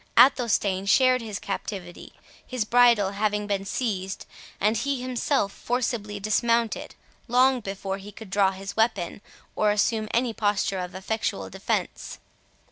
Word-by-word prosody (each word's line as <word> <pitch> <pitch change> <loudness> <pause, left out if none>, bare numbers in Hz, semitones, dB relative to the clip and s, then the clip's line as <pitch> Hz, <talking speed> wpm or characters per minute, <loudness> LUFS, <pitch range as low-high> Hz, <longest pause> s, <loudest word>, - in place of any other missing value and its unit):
Athelstane 210 -7 +4
shared 255 +3 +4
his 215 -3 -5
captivity, 190 -3 -6 0.3
his 250 -4 -3
bridle 235 -4 +5
having 210 0 0
been 200 -1 -2
seized, 195 -4 -3 0.3
and 215 +2 +2
he 275 +3 -1
himself 250 -3 0
forcibly 230 -4 -2
dismounted, 230 +2 0 0.3
long 255 +2 +4
before 195 -2 -4
he 200 +2 -10
could 210 -1 -12
draw 195 -1 +4
his 195 +1 -7
weapon, 205 -5 0 0.3
or 210 - +2
assume 215 +1 +1
any 235 0 +1
posture 205 -3 0
of 180 0 -5
effectual 215 +4 -3
defence. - - -3
210 Hz, 130 wpm, -26 LUFS, 195-235 Hz, 0.3 s, bridle